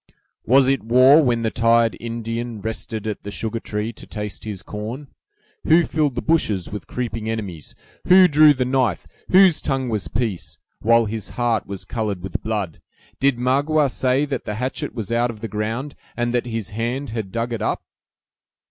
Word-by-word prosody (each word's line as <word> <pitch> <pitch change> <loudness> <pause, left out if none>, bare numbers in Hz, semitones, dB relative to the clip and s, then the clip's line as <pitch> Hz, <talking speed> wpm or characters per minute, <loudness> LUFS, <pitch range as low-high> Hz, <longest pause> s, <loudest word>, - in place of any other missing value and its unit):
"Was 130 +2 +5
it 135 0 +2
war, 130 +7 +6
when 120 -5 +1
the 110 - 0
tired 115 0 +3
Indian 115 0 -4
rested 110 0 -5
at 110 -1 -3
the 100 - -7
sugartree 110 0 -3
to - - -13
taste 105 -2 -6
his 100 -4 -6
corn! 115 +8 -6 0.5
who 165 +1 +5
filled 150 -5 0
the 125 - -3
bushes 110 - +1
with 105 - -6
creeping 115 -3 -4
enemies! 100 -9 -5 0.3
who 185 0 +8
drew 150 -1 +6
the 130 -1 0
knife, 130 0 0 0.2
whose 185 -3 +6
tongue 135 -2 -1
was 105 -3 -2
peace, 110 -6 -3 0.2
while 115 +1 +4
his 110 0 -5
heart 120 -3 0
was 100 -1 -6
colored 105 -6 -3
with 95 -2 -4
blood! 105 -7 -3 0.4
Did 135 -2 +2
Magua 140 +3 +2
say 130 +3 +1
that 135 -3 -4
the 105 - -3
hatchet 125 +3 -3
was 110 -3 -5
out 120 +1 +2
of 115 -2 -7
the 115 - -3
ground, 110 +7 -3 0.2
and 120 0 0
that 120 0 0
his 115 -4 -4
hand 120 +5 -3
had 110 -4 -4
dug 115 +2 -2
it 115 - -4
up?" - - -1
115 Hz, 180 wpm, -22 LUFS, 110-130 Hz, 0.5 s, who